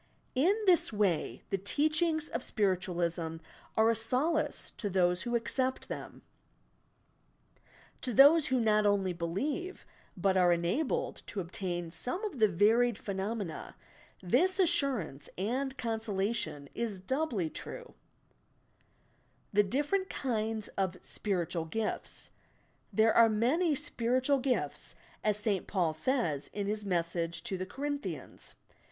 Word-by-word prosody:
In 325 +10 +3
this 360 -9 +4
way, 190 - 0
the 195 - 0
teachings 310 - +1
of 230 - -3
Spiritualism 175 -6 -1 0.4
are 220 +1 +5
a - - 0
solace 285 +7 0
to 205 - -2
those 180 -1 +2
who 240 +3 -1
accept 255 +3 -1
them. - - -7 1.8
To 250 - 0
those 290 +6 +7
who 260 -1 +2
not 215 -2 +3
only 195 -3 +2
believe, 275 - -3 0.3
but 190 +1 +2
are 180 -2 +5
enabled 175 - 0
to 205 - -4
obtain 175 -1 -3
some 250 - -3
of 345 - -5
the 215 - +6
varied 220 +6 +3
phenomena, 200 -2 -4 0.5
this 360 - +3
assurance 275 - +1
and 260 +8 -2
consolation 220 - -2
is 220 -5 -3
doubly 225 - -1
true, 485 -1 -8 1.6
THE 210 - +6
DIFFERENT 290 - 0
KINDS 220 -4 -2
OP 190 -2 0
"SPIRITUAL 175 -4 -1
GIFTS" 215 +6 -4 0.6
There 220 0 +4
are 230 -1 +7
many 280 +10 +2
"spiritual 255 +3 +1
gifts," 245 - -2 0.3
as 210 -1 +2
St. 210 -3 -1
Paul 175 -5 +1
says, 160 - -1
in 205 -1 -2
his 210 0 -3
message 170 -2 -1
to 220 -5 -3
the 185 0 -4
Corinthians. 285 +5 -5
215 Hz, 120 wpm, -31 LUFS, 185-265 Hz, 1.8 s, those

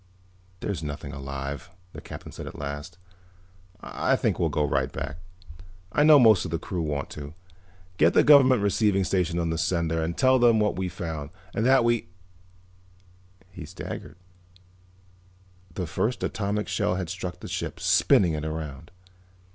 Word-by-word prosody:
"There's 100 -5 -3
nothing 70 -2 -6
alive," 70 +2 -6 0.2
the - - -9
Captain - - -9
said - - -8
at - - -9
last. 75 +5 -6 0.8
"I - - 0
think - - 0
we'll - - +2
go 75 - 0
right - - 0
back; 70 +3 -5 0.7
I 145 - +1
know 155 -1 +8
most 110 -8 +6
of 90 - -5
the 85 - -1
crew 90 +1 -4
want 75 -3 -3
to. 75 +1 -8 0.6
Get 85 - +4
the - - +6
Government 130 -6 +6
Receiving 100 -1 +2
Station 90 -2 0
on 85 -1 0
the 80 - -2
sender 80 -2 0
and 80 +1 -3
tell 130 0 +4
them 120 -2 +5
what 105 -1 +1
we 95 0 -2
found, 80 -5 -5 0.2
and 110 - 0
that 135 -1 +5
we 120 -5 +1 0.7
" 90 0 -30
He 90 -3 -9
staggered. 75 - -8 1.6
The 90 - -2
first 110 +9 -2
atomic 105 0 -2
shell 105 -4 0
had 90 -2 -3
struck 90 +1 -5
the - - -8
ship, - - -4
spinning 90 -4 +4
it 75 0 -3
around. 80 0 -6
90 Hz, 165 wpm, -26 LUFS, 80-105 Hz, 1.6 s, know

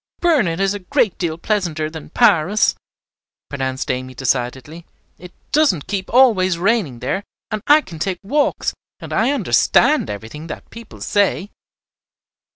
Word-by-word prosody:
"Burnet 275 - +2
is 195 0 +1
a 205 - -5
great 190 +2 0
deal 165 -3 -2
pleasanter 170 -5 -1
than 155 -1 -9
Paris," 175 +6 +3 0.8
pronounced 130 -1 -3
Amy, 130 0 -5
decidedly. 135 +5 -2 0.4
"It 180 0 -11 0.2
doesn't 280 - +2
keep 195 -2 -4
always 210 -8 +4
raining 180 - 0
there, 145 +11 -2 0.3
and 215 -1 -2
I 300 +1 +7
can 165 - -11
take 185 +2 -2
walks, 290 +9 0 0.3
and - - -8
I 225 +4 +2
understand 215 - +3
everything 110 +10 -7
that - - -9
people 230 0 -12
say." 205 -1 0
180 Hz, 140 wpm, -19 LUFS, 150-210 Hz, 0.8 s, I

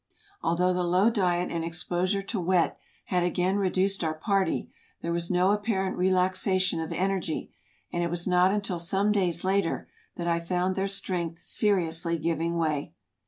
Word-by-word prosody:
Although 180 +2 +2
the 180 - 0
low 185 +6 +3
diet 180 -5 0
and 170 -1 -2
exposure 180 +4 -1
to 200 +1 -3
wet 180 0 +2 0.3
had 180 -1 0
again 180 +2 +1
reduced 195 0 +1
our 155 -1 -1
party, 195 +4 0 0.4
there 170 - -2
was 170 0 -1
no 180 +1 +3
apparent 205 -2 0
relaxation 185 0 +2
of 160 - -4
en 190 +2 0
ergy, 180 -5 -3 0.4
and 175 - 0
it 170 - 0
was 175 0 -2
not 180 0 +4
until 200 -4 -2
some 195 +5 +1
days 180 -5 +1
later 190 -2 0 0.3
that 170 - -4
I 170 -1 +1
found 180 +2 -1
their 195 0 0
strength 175 -4 0
seriously 170 -5 +1
giving 165 +1 -1
way. 155 -3 -1
180 Hz, 165 wpm, -27 LUFS, 170-190 Hz, 0.4 s, not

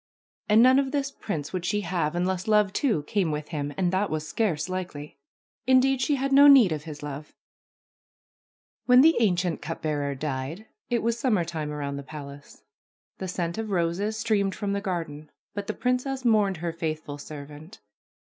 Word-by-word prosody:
And 215 +2 +6
none 260 +2 +6
of 275 -1 0
this 275 -1 -2
prince 155 - -5
would 185 -2 -2
she 205 +4 0
have 170 -4 -1
unless 180 +2 -1
love, 210 -2 +3
too, 220 - +1
came 185 +2 0
with 150 0 -4
him, 145 -3 -3
and 185 -1 +1
that 195 +2 +1
was 155 0 -3
scarce 175 -9 -1
likely. 175 -6 -6 0.5
Indeed, 260 0 +4
she 290 - +2
had 275 0 -1
no 285 +1 +8
need 265 - +8
of 150 -1 -3
his 150 -2 -8
love! 150 +1 -7 1.5
When 250 0 +7
the 325 +3 +6
ancient 180 -6 +1
cup 165 +2 -6
bearer 145 -2 -1
died 145 +7 -4 0.2
it 235 -2 0
was 230 0 0
summertime 170 - -1
around 140 -1 -4
the - - -5
palace. 140 0 -11 0.6
The 190 - -4
scent 175 +1 -3
of 220 -1 -4
roses 190 +4 -1
streamed 210 -3 0
from 205 -2 -2
the 200 - -1
garden. 165 -6 -4 0.2
But 205 -1 -5
the 215 - -3
princess 255 +1 -1
mourned 210 -5 +3
her 170 0 -3
faithful 155 -3 -4
servant. 150 +5 -10
180 Hz, 175 wpm, -26 LUFS, 150-220 Hz, 1.5 s, no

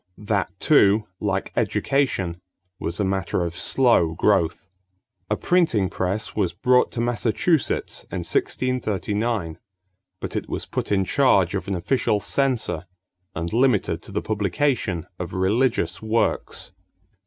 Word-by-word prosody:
That 105 -2 -1
too, 105 -7 +4
like 95 -2 -2
education, 100 -11 0 0.4
was 85 - -3
a - - +2
matter 95 -2 -1
of 85 -1 -4
slow 105 -9 +3
growth. 95 -1 +1 0.6
A - - +2
printing 160 - +2
press 100 +4 -2
was 95 -6 0
brought 125 +8 +3
to 115 - -1
Massachusetts 120 +6 0
in 90 -2 -3
1639, 105 -5 -1 0.6
but - - -5
it - - -3
was - - -3
put - - -4
in 95 -2 +2
charge 100 -8 +3
of 100 -1 -3
an 100 - -1
official 105 +3 +1
censor 120 - -1 0.5
and 85 +3 -3
limited 110 -9 +2
to - - -11
the 105 - -2
publication 105 - 0
of 90 -2 -5
religious 95 -1 +1
works. 110 +1 -1
105 Hz, 130 wpm, -23 LUFS, 90-120 Hz, 0.6 s, too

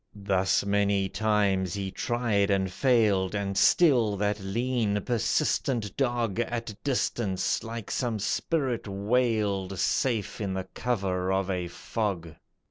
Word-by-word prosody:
Thus 95 -1 +1
many 100 -1 +2
times 100 -4 +1
he 100 -1 -3
tried 110 -3 0
and 95 -2 +1
failed, 105 -6 +2
And 100 -1 -2
still 120 - +4
that 105 +1 0
lean, 110 +1 -1
persistent 115 -1 0
dog 120 -6 0
At 120 -1 -2
distance, 110 -8 0
like 115 -2 -6
some 120 -4 -1
spirit 130 - -1
wailed, 100 -2 0
Safe 115 +1 0
in 95 -2 -2
the 95 0 -4
cover 95 -6 -1
of 95 0 0
a 90 -2 -2
fog. 90 -2 -3
105 Hz, 125 wpm, -27 LUFS, 95-120 Hz, -, still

